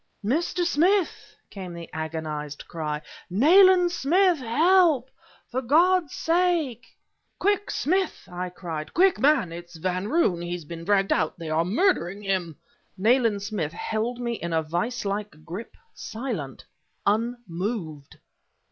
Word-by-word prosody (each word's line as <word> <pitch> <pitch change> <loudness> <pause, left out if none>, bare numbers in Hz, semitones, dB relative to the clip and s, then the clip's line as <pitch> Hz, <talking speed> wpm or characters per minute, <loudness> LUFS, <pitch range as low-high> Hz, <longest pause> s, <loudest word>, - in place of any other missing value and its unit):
"Mr. 340 - 0
Smith!" 350 +4 +1 0.2
came 185 -3 -7
the 170 -1 -8
agonized 155 -2 -5
cry... 150 -3 -3 0.3
"Nayland 355 - +6
Smith, 350 +2 +3
help! 300 +2 +3 0.4
for 255 +2 -1
God's 330 +4 +3
sake...." 330 -8 0 0.4
"Quick, 405 +1 +1
Smith!" 375 - -1
I 180 0 -5
cried, 165 -4 -6
"quick, 375 +1 +4
man! 275 - +3
It's 170 0 -9
Van 185 +4 -2
Roon 215 - +2
he's 175 -1 -5
been 165 +2 -8
dragged 195 +1 +2
out... 160 - -1
they 165 -2 -6
are 160 +1 +2
murdering 205 - +1
him..." 185 -5 -1 0.4
Nayland 220 0 +2
Smith 190 -7 -3
held 225 +6 -3
me 240 -1 -2
in 170 -6 -4
a 160 0 +1
vise 180 +10 -2
like 200 -6 -4
grip, 185 +8 -8 0.2
silent, 220 - -6 0.4
unmoved! 200 - -2
210 Hz, 130 wpm, -25 LUFS, -, 0.4 s, Nayland